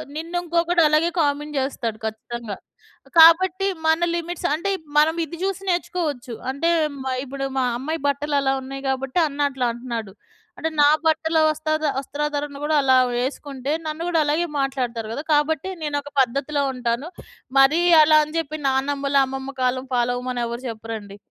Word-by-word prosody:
నిన్ను 330 +3 -5
ఇంకొకడు 340 0 +1
అలాగే 310 +3 +3
కామెంట్ 295 +1 -1
జేస్తాడు 235 -5 -3
ఖచ్చితంగా. 220 -1 -5 0.6
కాబట్టి 365 +4 +6 0.2
మన 320 +2 +3
లిమిట్స్ 345 0 -3
అంటే 365 +6 -1 0.3
మనం 315 +2 +4
ఇది 330 +2 -9
జూసి 390 0 -2
నేర్చుకోవచ్చు. 310 -8 -2 0.2
అంటే 305 +5 0 0.3
మ - - -11 0.2
ఇప్పుడు 275 0 -5
మా 260 - +2
అమ్మాయి 310 +6 -3
బట్టలు 285 +1 -1
అలా 270 -1 +1
ఉన్నాయి 270 +1 -7
కాబట్టి 265 +4 -1
అన్న 285 -1 -9
అట్లా 260 -2 -2
అంటున్నాడు. 235 -4 -6 0.4
అంటే 320 - -2
నా 290 - +7 0.2
బట్టల 320 0 +2
వస్తద 310 0 -1
వస్త్రాధారణ 290 +1 -3
కూడా 305 +1 +1
అలా 260 -1 +4 0.2
వేసుకుంటే 270 +1 -3
నన్ను 310 +2 -4
కూడా 335 -2 +2
అలాగే 310 +4 +1
మాట్లాడుతారు 250 -5 -2
గదా! 285 - -4
కాబట్టి 295 +4 +1
నేనొక 290 -1 -3
పద్ధతిలో 275 +3 0
ఉంటాను. 245 +4 -2 0.5
మరి 270 +5 +5 0.2
అలా 310 0 +6
అని 305 +2 -8
జెప్పి 310 -1 -3
నానమ్మలు, 275 +1 +1
అమ్మమ్మ 265 +1 -6
కాలం 255 +1 0
ఫాలో 245 0 +1
అవ్వమని 250 -1 -3
ఎవరు 235 +1 -5
చెప్పరండి. 220 -3 -7
285 Hz, 150 wpm, -22 LUFS, 255-315 Hz, 0.6 s, నా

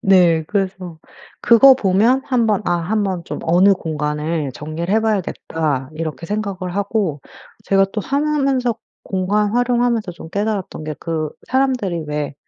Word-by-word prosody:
네. 175 -4 +4
그래서 185 -3 -3 0.4
그거 260 +3 +7
보면 225 +4 +2
한번 225 -5 +1
아 175 - +1
한번 185 0 -1
좀 - - -5
어느 180 +4 +4
공간을 150 -3 -2
정리를 155 +7 -4
해봐야겠다. 165 -10 -1
이렇게 160 +1 -5
생각을 200 -3 -3
하고 200 -6 -1 0.4
제가 195 0 +3
또 215 - -2
하며 280 +7 -1
하면서 270 -6 +1 0.3
공간 200 +2 0
활용하면서 240 -4 +1
좀 170 -1 -11
깨달았던 200 -5 -3
게 155 0 -4
그 160 -2 -3 0.2
사람들이 250 -11 0
왜 150 -1 -3
195 Hz, 300 characters per minute, -19 LUFS, 165-220 Hz, 0.4 s, 그거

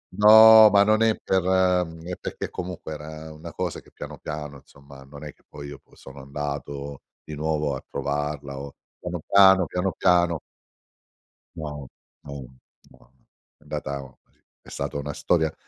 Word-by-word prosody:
No, 110 +1 +9
ma 100 0 +6
non 110 +1 +3
è 110 -1 +3
per 95 -2 +1
mhmm, 90 -3 +1
è 90 - -4
perché - - -5
comunque 90 -3 -6
era 80 +1 -9
una 75 - -10
cosa - - -4
che - - -22
piano, - - -9
piano, 75 -2 -7
insomma, 70 -1 -16
non 70 +2 -12
è 75 - -8
che - - -33
poi 70 -1 -10
io 70 -1 -10
sono 70 0 -13
andato 70 0 -6 0.2
di 75 - -8
nuovo 75 -2 -1
a - - -8
trovarla 70 -1 -4
o 70 0 -8 0.3
piano, 90 -1 -5
piano, 95 -2 +6
piano, 90 +1 -2
piano. 85 -2 +3 1.2
No, 75 -4 -7 0.4
no, 70 -3 -8 0.4
no. - - -23 0.5
È - - -46
andata 70 -2 -6 0.4
è - - -16
stata - - -4
una 70 0 -5
storia 80 0 0
75 Hz, 155 wpm, -24 LUFS, 70-90 Hz, 1.2 s, No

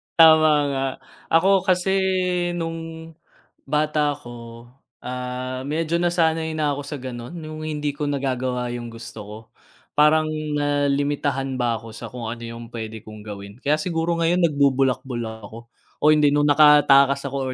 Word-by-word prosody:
tama 160 -1 +7 0.2
nga. 135 0 -1 0.4
Ako 185 +3 +3
kasi 185 +1 +2 0.6
nung 165 -1 -6 0.5
bata 150 +1 +1
ako, 120 -4 -10 0.3
ah, 125 +1 -5
medyo 160 +3 -1
nasanay 165 -2 +1
na 150 -2 0
ako 145 - -5
sa 145 +1 -6
gano'n, 120 +1 -7
yung 155 0 -7
hindi 150 -2 -3
ko 150 - -5
nagagawa 130 -3 -1
yung 120 -1 -6
gusto 115 -1 -10
ko. 105 +1 -9 0.6
Parang 155 +1 +4 0.3
nalimitahan 145 -1 0
ba 120 -2 0
ako 110 0 -11
sa - - -8
kung 125 -2 -7
ano 115 +1 -6
yung 115 0 -7
p'wede 110 -1 -7
kong 110 -1 -10
gawin. 100 +2 -9
Kaya 150 +2 +2
siguro 165 +1 -1
ngayon 170 +2 +2
nagbubulakbul 135 -5 +1
lang 110 -1 -6
ako, 115 +3 -12 0.3
o 150 - +6
hindi 150 -1 +4
nung 145 0 +3
nakatakas 145 -2 +6
ako 135 -1 -3
140 Hz, 145 wpm, -22 LUFS, 120-155 Hz, 0.6 s, tama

